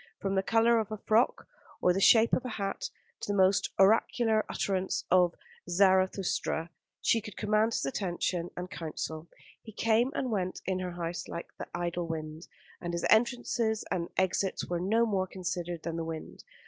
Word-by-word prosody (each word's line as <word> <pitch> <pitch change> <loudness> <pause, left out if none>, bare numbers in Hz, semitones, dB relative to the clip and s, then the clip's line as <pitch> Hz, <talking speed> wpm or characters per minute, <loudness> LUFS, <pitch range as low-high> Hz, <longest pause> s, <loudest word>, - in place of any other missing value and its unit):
From 195 0 -2
the 190 - +2
colour 230 +3 +3
of 220 -1 -3
a 215 - -3
frock 220 +4 +1 0.3
or 180 - +3
the 195 - -1
shape 225 +2 +6
of - - +2
a 250 - -4
hat, 195 -1 -3 0.3
to - - -3
the 205 - 0
most 190 +1 +3
oracular 220 +2 +3
utterance 190 -1 -1
of 180 -1 +4 0.3
Zarathustra, 185 -2 +2 0.3
she 225 - +3
could 210 -2 -10
command 215 +1 +2
his - - -1
attention 175 +2 -2
and 180 0 -4
counsel. 160 -1 -5 0.3
He 220 - -11
came 230 +4 +2
and 255 -3 -1
went 185 -3 -2
in 185 0 -1
her 180 -1 -4
house 175 0 -4
like 170 - -7
the - - -5
idle 175 0 -2
wind; 155 0 -6 0.3
and 175 -1 -4
his 170 - -1
entrances 230 -1 +2
and 170 -1 -1
exits 190 +1 0
were 175 -1 -2
no 220 +6 +2
more 195 -4 0
considered 175 -2 -4
than 165 0 -3
the 165 - -2
wind. 160 -1 -7
190 Hz, 175 wpm, -30 LUFS, 175-220 Hz, 0.3 s, shape